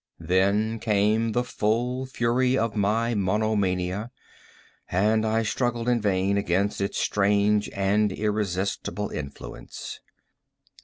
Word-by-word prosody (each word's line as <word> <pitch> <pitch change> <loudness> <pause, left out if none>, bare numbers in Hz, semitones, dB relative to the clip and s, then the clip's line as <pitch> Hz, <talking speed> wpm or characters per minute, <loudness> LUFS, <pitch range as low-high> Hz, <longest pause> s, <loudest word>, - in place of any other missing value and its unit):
Then 100 +5 +1
came 110 +1 +1
the 120 - +1
full 125 +3 -1
fury 125 +1 +1
of 115 -2 -1
my 110 +3 +1
monomania, 100 -1 0 0.8
and 110 +4 +2
I 110 +1 +1
struggled 120 +2 -1
in 120 -2 +2
vain 100 0 +1
against 100 +1 0
its 100 - -2
strange 105 +1 +2
and 100 +2 +1
irresistible 105 0 -2
influence. 70 -2 -7
105 Hz, 105 wpm, -25 LUFS, 100-115 Hz, 0.8 s, and